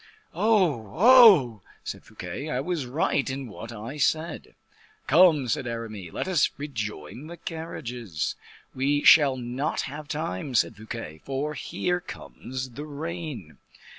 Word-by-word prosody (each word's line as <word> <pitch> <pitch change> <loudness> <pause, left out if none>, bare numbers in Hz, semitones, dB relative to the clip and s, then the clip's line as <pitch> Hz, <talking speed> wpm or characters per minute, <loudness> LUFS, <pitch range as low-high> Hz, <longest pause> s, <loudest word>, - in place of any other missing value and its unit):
"Oh, 175 - +1
oh!" 200 - +7 0.2
said - - -6
Fouquet, 145 +3 -7
"I 125 - -1
was 155 0 -2
quite 125 - -10
right 145 -1 +1
in 135 0 -4
what 115 +3 -9
I 115 +6 -7
said." 160 +3 -1 0.5
"Come," 155 -3 +5
said 120 +2 -1
Aramis, 110 -7 -6
"let - - -3
us 175 -6 +3
rejoin 115 - -6
the 170 +1 -9
carriages." 125 - -5 0.4
"We 140 +2 +1
shall 140 -4 +7
not 125 +4 -2
have 145 +2 -7
time," 135 - -4
said 115 - +2
Fouquet, 110 -7 -8
"for 140 +3 -3
here 180 +4 -2
comes 130 -5 -7
the 145 +5 -7
rain." 150 - -6
135 Hz, 135 wpm, -26 LUFS, 115-160 Hz, 0.5 s, oh